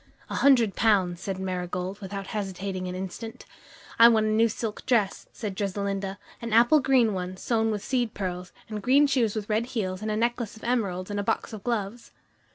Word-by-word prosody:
"A - - -2
hundred 245 -7 +4
pounds," 185 -6 +2
said 195 -1 -3
Marigold, 185 +1 -3
without 195 0 -5
hesitating 190 -2 -3
an 180 - -4
instant. 190 +5 -7 0.5
"I 230 - +10
want 220 -2 +3
a - - +1
new 225 +2 +3
silk 220 0 -4
dress," 220 -6 +1
said 210 -4 -5
Dressalinda, 195 0 -2 0.2
"an 230 -2 -4
apple 240 +7 +6
green 255 -5 +3
one, 185 0 -4
sewn 225 +2 0
with 210 -2 -2
seed 245 -4 0
pearls, 180 -2 -4 0.2
and 215 -1 -5
green 270 +7 +5
shoes 250 -7 +1
with 210 -1 -3
red 220 +2 0
heels, 185 -2 -2
and 215 - -3
a 215 - 0
necklace 235 -1 -1
of - - -16
emeralds, 205 -6 -1
and 205 - -2
a - - -1
box 210 - -1
of 210 -3 -8
gloves." 230 -1 -3
210 Hz, 195 wpm, -27 LUFS, 190-230 Hz, 0.5 s, I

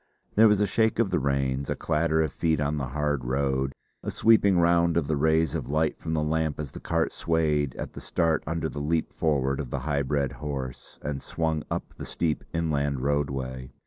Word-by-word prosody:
There 110 +2 +7
was 105 -2 +4
a 105 - +3
shake 110 +3 +2
of 115 -4 +2
the - - +2
reins, 70 -1 0
a - - 0
clatter 80 0 +1
of 80 - -3
feet 80 -2 +1
on 75 +1 0
the 70 -3 -2
hard 75 0 -1
road, 65 +1 0 0.3
a - - -4
sweeping 100 -4 +4
round 85 0 +3
of 85 - +2
the 75 - 0
rays 80 +1 +2
of - - -3
light 75 +1 +1
from 80 - -3
the 75 - +1
lamp 80 -1 0
as 75 -2 -4
the - - -8
cart 85 0 0
swayed 75 -4 0
at - - -6
the - - -8
start 80 -2 +1
under 80 0 -1
the 75 - -5
leap 80 +2 0
forward 70 -4 +1
of 70 -5 -4
the 65 +1 -3
high 70 0 0
bred 70 0 0
horse 70 -4 -6
and 70 -2 -3
swung 80 -2 -1
up - - -4
the - - -8
steep 80 -3 -1
inland 75 -5 0
roadway. 65 -3 -2
75 Hz, 210 wpm, -27 LUFS, 70-80 Hz, 0.3 s, There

